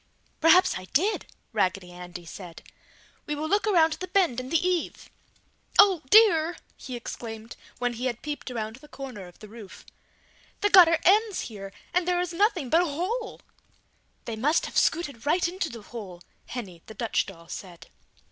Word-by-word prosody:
"Perhaps 330 Hz, -, +5 dB
I 185 Hz, -, -10 dB
did!" 365 Hz, -, 0 dB, 0.3 s
Raggedy 190 Hz, -3 st, 0 dB
Andy 175 Hz, -1 st, -9 dB
said, 170 Hz, 0 st, -10 dB, 0.6 s
"We 295 Hz, -, -2 dB
will 305 Hz, +2 st, -3 dB
look 410 Hz, +5 st, +1 dB
around 325 Hz, -6 st, +4 dB
the 370 Hz, +4 st, -6 dB
bend 360 Hz, -, +2 dB
in 255 Hz, 0 st, -6 dB
the 330 Hz, -, +3 dB
eave!" 360 Hz, -3 st, -2 dB, 0.7 s
"Oh 390 Hz, -5 st, +6 dB
dear!" 350 Hz, -6 st, +6 dB, 0.2 s
he 255 Hz, -, -8 dB
exclaimed 225 Hz, -1 st, -7 dB, 0.2 s
when 245 Hz, -1 st, -1 dB
he 245 Hz, +3 st, -3 dB
had 240 Hz, -2 st, -4 dB
peeped 295 Hz, -2 st, -5 dB
around 220 Hz, -2 st, -4 dB
the 300 Hz, -, -16 dB
corner 255 Hz, -10 st, -8 dB
of 175 Hz, -, -16 dB
the 215 Hz, -, -12 dB
roof, 210 Hz, -2 st, -12 dB, 0.8 s
"the 410 Hz, -1 st, +2 dB
gutter 340 Hz, -3 st, +8 dB
ends 415 Hz, +2 st, +3 dB
here 195 Hz, -3 st, -8 dB, 0.2 s
and 360 Hz, 0 st, +1 dB
there 355 Hz, -1 st, +2 dB
is 355 Hz, -1 st, -2 dB
nothing 370 Hz, -, +1 dB
but 330 Hz, -, +5 dB
a -, -, +1 dB
hole!" 370 Hz, +10 st, -3 dB, 0.8 s
"They 230 Hz, -, -4 dB
must 290 Hz, +9 st, +1 dB
have -, -, -8 dB
scooted 285 Hz, -7 st, 0 dB
right 345 Hz, +3 st, +3 dB
into 350 Hz, -1 st, -3 dB
the 230 Hz, -2 st, -10 dB
hole," 200 Hz, -7 st, -9 dB, 0.3 s
Henny, 190 Hz, -9 st, -7 dB
the 220 Hz, -, -10 dB
Dutch 230 Hz, -2 st, 0 dB
doll 170 Hz, -3 st, -12 dB
said. 175 Hz, -2 st, -9 dB
280 Hz, 175 wpm, -26 LUFS, 220-355 Hz, 0.8 s, gutter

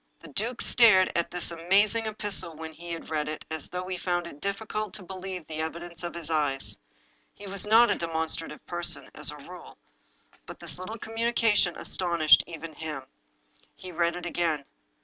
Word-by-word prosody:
The 165 Hz, -, -12 dB
duke 225 Hz, -, -2 dB
stared 210 Hz, -6 st, +6 dB
at 170 Hz, -, +1 dB
this 175 Hz, -1 st, -1 dB
amazing 200 Hz, +7 st, +3 dB
epistle 200 Hz, -6 st, -1 dB
when 160 Hz, 0 st, -7 dB
he 170 Hz, +2 st, -10 dB
had 165 Hz, -1 st, -6 dB
read 150 Hz, -1 st, 0 dB
it 155 Hz, -, -5 dB
as 160 Hz, -2 st, -3 dB
though 180 Hz, 0 st, -3 dB
he 185 Hz, -1 st, -3 dB
found 175 Hz, -1 st, 0 dB
it 145 Hz, -4 st, -10 dB
difficult 215 Hz, +1 st, -3 dB
to 200 Hz, -, -8 dB
believe 185 Hz, -2 st, -6 dB
the 155 Hz, 0 st, -6 dB
evi 160 Hz, +1 st, -2 dB
dence 170 Hz, -1 st, -9 dB
of 175 Hz, -, -4 dB
his 165 Hz, -2 st, -3 dB
eyes. 145 Hz, -4 st, +2 dB, 0.6 s
He 205 Hz, -, -10 dB
was 200 Hz, +1 st, -2 dB
not 230 Hz, +3 st, +7 dB
a -, -, +3 dB
demonstrative 160 Hz, -2 st, -2 dB
person, 175 Hz, 0 st, -2 dB
as -, -, -1 dB
a -, -, -6 dB
rule, -, -, -11 dB, 0.7 s
but -, -, -9 dB
this -, -, -2 dB
little 215 Hz, +5 st, -5 dB
communication 225 Hz, -4 st, +2 dB
astonished 170 Hz, -4 st, +4 dB
even 165 Hz, -1 st, -7 dB
him. 150 Hz, -3 st, -5 dB, 0.7 s
He 185 Hz, -, -9 dB
read 170 Hz, 0 st, +1 dB
it 180 Hz, 0 st, -6 dB
again. 165 Hz, -4 st, 0 dB
175 Hz, 185 wpm, -28 LUFS, 160-200 Hz, 0.7 s, not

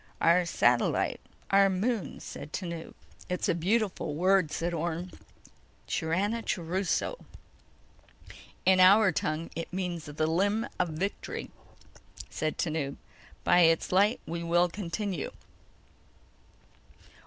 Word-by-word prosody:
"Our 170 Hz, +1 st, +4 dB
satellite... 120 Hz, -6 st, +2 dB, 0.3 s
our 195 Hz, 0 st, +6 dB
moon," 205 Hz, +3 st, -2 dB
said 145 Hz, -, -8 dB
Tanub. 170 Hz, -3 st, -5 dB, 0.3 s
"It's 180 Hz, -, -1 dB
a -, -, +3 dB
beautiful 185 Hz, -3 st, 0 dB
word," 185 Hz, -1 st, +3 dB
said 170 Hz, +1 st, -2 dB
Orne. 170 Hz, +2 st, -3 dB, 0.8 s
"Chiranachuruso." 190 Hz, -, -1 dB, 1.5 s
"In 185 Hz, 0 st, +5 dB
our 190 Hz, +2 st, +7 dB
tongue 155 Hz, +1 st, -2 dB
it 165 Hz, -, -5 dB
means: 180 Hz, -3 st, -3 dB
The 155 Hz, +1 st, -2 dB
Limb 200 Hz, +7 st, +1 dB
of 180 Hz, -, +1 dB
Victory," 180 Hz, +6 st, -4 dB, 0.8 s
said 155 Hz, 0 st, -2 dB
Tanub. 155 Hz, -4 st, -2 dB, 0.5 s
"By 175 Hz, -, +5 dB
its 165 Hz, -1 st, +4 dB
light 200 Hz, +5 st, +3 dB
we 170 Hz, +1 st, -4 dB
will 175 Hz, +1 st, +2 dB
continue." 185 Hz, -2 st, -3 dB
175 Hz, 105 wpm, -29 LUFS, 165-195 Hz, 1.5 s, our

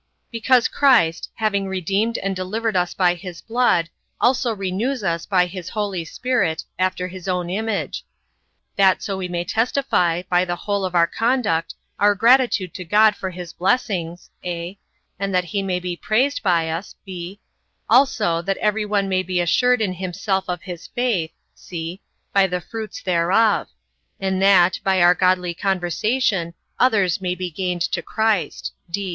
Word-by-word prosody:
Because 240 Hz, +1 st, +3 dB
Christ, 225 Hz, -, +3 dB
having 200 Hz, -3 st, 0 dB
redeemed 195 Hz, +5 st, -1 dB
and 195 Hz, 0 st, -2 dB
delivered 210 Hz, +4 st, -2 dB
us 180 Hz, -1 st, +1 dB
by 180 Hz, -2 st, +3 dB
his 175 Hz, -1 st, -9 dB
blood, 230 Hz, -8 st, +1 dB, 0.3 s
also 245 Hz, -1 st, +2 dB
renews 205 Hz, +6 st, -2 dB
us 170 Hz, -2 st, -1 dB
by 185 Hz, -3 st, +3 dB
his 180 Hz, -1 st, -7 dB
Holy 200 Hz, -5 st, -2 dB
Spirit, 190 Hz, -5 st, -1 dB, 0.2 s
after 185 Hz, 0 st, 0 dB
his 185 Hz, 0 st, -9 dB
own 180 Hz, -1 st, -1 dB
image; 220 Hz, +2 st, -2 dB, 0.7 s
that 190 Hz, -1 st, +4 dB
so 200 Hz, -3 st, -2 dB
we 190 Hz, -1 st, -3 dB
may 175 Hz, -1 st, -2 dB
testify, 180 Hz, -5 st, +1 dB
by 180 Hz, 0 st, +3 dB
the 175 Hz, -1 st, -2 dB
whole 200 Hz, +2 st, -2 dB
of 180 Hz, -1 st, -4 dB
our 170 Hz, -1 st, +5 dB
conduct, 225 Hz, -5 st, 0 dB, 0.2 s
our 205 Hz, 0 st, +4 dB
gratitude 230 Hz, -5 st, +3 dB
to 185 Hz, -, -6 dB
God 210 Hz, +4 st, +4 dB
for 190 Hz, -, -4 dB
his 180 Hz, -2 st, -8 dB
blessings, 180 Hz, -5 st, -1 dB
(a) 175 Hz, +1 st, -4 dB, 0.4 s
and 195 Hz, -1 st, -1 dB
that 180 Hz, -, +3 dB
he 185 Hz, +4 st, -3 dB
may 185 Hz, -2 st, -1 dB
be 180 Hz, -1 st, -4 dB
praised 255 Hz, +10 st, 0 dB
by 170 Hz, -4 st, +2 dB
us; 165 Hz, +4 st, -5 dB
(b) 185 Hz, +1 st, -7 dB, 0.5 s
also, 220 Hz, -8 st, +3 dB
that 195 Hz, +3 st, -2 dB
every 210 Hz, 0 st, 0 dB
one 205 Hz, -1 st, +1 dB
may 185 Hz, -1 st, +1 dB
be 185 Hz, -1 st, -2 dB
assured 250 Hz, +8 st, +3 dB
in 190 Hz, -3 st, -1 dB
himself 190 Hz, +2 st, -2 dB
of 180 Hz, -1 st, -4 dB
his 175 Hz, -3 st, -8 dB
faith, 220 Hz, -10 st, -1 dB, 0.2 s
(c) 170 Hz, +2 st, -7 dB, 0.3 s
by 195 Hz, -1 st, +4 dB
the 180 Hz, -1 st, -2 dB
fruits 220 Hz, +2 st, -7 dB
thereof; 185 Hz, +5 st, +2 dB, 0.5 s
and 190 Hz, -1 st, -1 dB
that, 190 Hz, -2 st, +5 dB
by 190 Hz, -1 st, +2 dB
our 175 Hz, 0 st, +6 dB
godly 180 Hz, -1 st, +1 dB
conversation 190 Hz, 0 st, 0 dB, 0.2 s
others 200 Hz, -8 st, +3 dB
may 180 Hz, -1 st, -1 dB
be 180 Hz, 0 st, -4 dB
gained 180 Hz, +1 st, -3 dB
to -, -, -1 dB
Christ. 220 Hz, -8 st, -1 dB
190 Hz, 160 wpm, -21 LUFS, 175-215 Hz, 0.7 s, our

